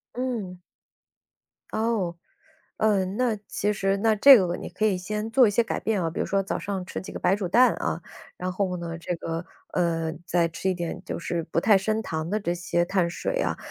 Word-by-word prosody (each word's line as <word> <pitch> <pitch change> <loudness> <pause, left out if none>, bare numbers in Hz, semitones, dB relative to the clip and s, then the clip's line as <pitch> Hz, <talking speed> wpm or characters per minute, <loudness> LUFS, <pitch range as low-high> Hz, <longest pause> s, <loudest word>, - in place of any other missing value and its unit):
嗯。 230 -8 -3 1.1
哦。 215 -6 0 0.6
嗯， 200 -2 +1
那 245 -3 +2
其 210 +1 0
实 195 0 0
那 220 +2 +3
这 265 +5 +9
个 180 -3 0
你 - - -7
可 195 +5 -1
以 200 -4 +2
先 210 +4 -4
做 250 0 +6
一 - - +1
些 235 +3 +3
改 - - -3
变 210 -3 0
啊。 165 - 0
比 - - -5
如 - - +1
说 195 0 +1
早 - - -3
上 195 -2 -4
吃 - - -5
几 - - -9
个 - - -6
白 180 +2 +3
煮 200 -3 -3
蛋， 245 +8 +5
啊， - - -2 0.4
然 185 +1 -3
后 185 -1 -1
呢， 170 -1 -5
这 175 - -3
个 165 +1 -4 0.3
嗯， 165 -2 0
再 170 -1 +2
吃 165 +3 -3
一 185 - 0
点 175 -1 -4
就 - - -4
是 170 0 -2
不 165 - -1
太 210 +4 +5
升 215 +3 -1
糖 160 -2 -3
的 210 +3 0
这 175 -4 -1
些 175 0 0
碳 180 -1 +1
水 - - -2
啊。 - - -1
190 Hz, 230 characters per minute, -26 LUFS, 175-215 Hz, 1.1 s, 这